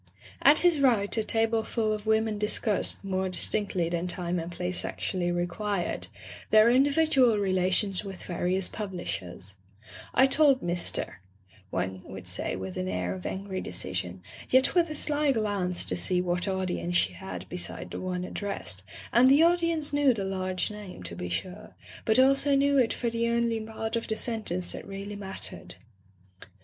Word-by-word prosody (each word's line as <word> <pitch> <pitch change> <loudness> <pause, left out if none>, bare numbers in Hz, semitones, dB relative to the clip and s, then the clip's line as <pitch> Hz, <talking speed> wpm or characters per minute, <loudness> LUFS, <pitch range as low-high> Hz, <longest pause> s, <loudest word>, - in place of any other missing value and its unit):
At 290 +2 +6
his 345 -4 +3
right 230 -7 +3
a 220 - +1
tableful 225 0 0
of 210 0 -6
women 220 -1 +1
discussed, 210 -1 +2
more 190 -1 -1
distincdy 185 -1 0
than 170 +1 -2
time 175 0 -1
and 165 +1 -6
place 180 +1 -3
actually 175 -2 -2
required, 175 +2 -2 0.4
their 220 +2 +6
individual 275 -3 +3
relations 190 0 +2
with 195 -2 -8
various 180 +1 -1
publishers: 100 - -6 0.6
"I 260 - +6
told 275 -1 +4
Mr. 175 - -1 0.2
" 95 -1 -30
one 95 +1 -3
would 95 -1 -9
say 90 0 0
with 95 0 -6
an 90 - -2
air 90 -1 -2
of 95 -1 -6
angry 190 -1 -4
decision, 90 0 -4 0.3
yet 260 +1 +4
with 345 -2 +3
a 305 - -5
sly 295 -1 +2
glance 200 -5 +1
to - - 0
see 90 - +1
what 180 +1 -1
audience 90 - -2
she 90 +1 +3
had 90 0 -8
beside 90 -1 -6
the - - -5
one 180 -1 -3
ad - - -9
dressed, 105 - -4 0.3
and 250 +2 +6
the 285 +4 +6
audience 335 -3 +2
knew 285 -4 +3
the 200 - -3
large 185 0 -2
name, 205 - -9
to 90 -1 -6
be 90 0 -5
sure, 185 - -6 0.3
but 220 - +3
also 275 +2 +4
knew 280 +1 +3
it 250 -4 +3
for 235 -2 -2
the 235 0 0
only 235 -1 +1
part 220 +1 -4
of 230 - -2
the 220 - -2
sentence 215 -7 -1
that - - -8
really 200 +1 -6
mattered. 195 -1 -6
195 Hz, 170 wpm, -28 LUFS, 175-235 Hz, 0.6 s, At